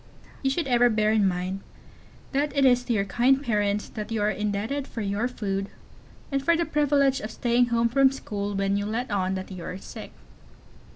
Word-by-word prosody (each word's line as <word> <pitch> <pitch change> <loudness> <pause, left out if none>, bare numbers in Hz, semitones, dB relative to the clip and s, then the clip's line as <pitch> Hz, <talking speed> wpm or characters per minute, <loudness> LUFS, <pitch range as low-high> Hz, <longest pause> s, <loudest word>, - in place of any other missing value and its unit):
You 270 - +1
should 320 +5 -1
ever 245 -1 +4
bear 215 -1 +2
in 215 -3 +3
mind 185 +1 -2 0.7
that 285 +1 -1
it 275 - +5
is 245 -1 +4
to 240 - 0
your 200 -3 +1
kind 250 +7 +2
parents 210 -4 0
that 215 0 -6
you 225 - -1
are 210 - +2
indebted 210 +7 -2
for 230 - -6
your 205 +3 -1
food, 195 -5 -3 0.6
and 275 -1 0
for 335 +3 +3
the 340 - +1
privilege 280 -3 +2
of 215 - -5
staying 240 +1 +2
home 235 -1 +2
from 265 +2 +4
school 205 -6 -4
when 195 0 +1
you 205 0 -2
let 230 +2 -3
on 190 -1 0
that 190 +1 -6
you 180 -2 -7
are 180 - -5
sick. - - -9
225 Hz, 205 wpm, -26 LUFS, 200-265 Hz, 0.7 s, it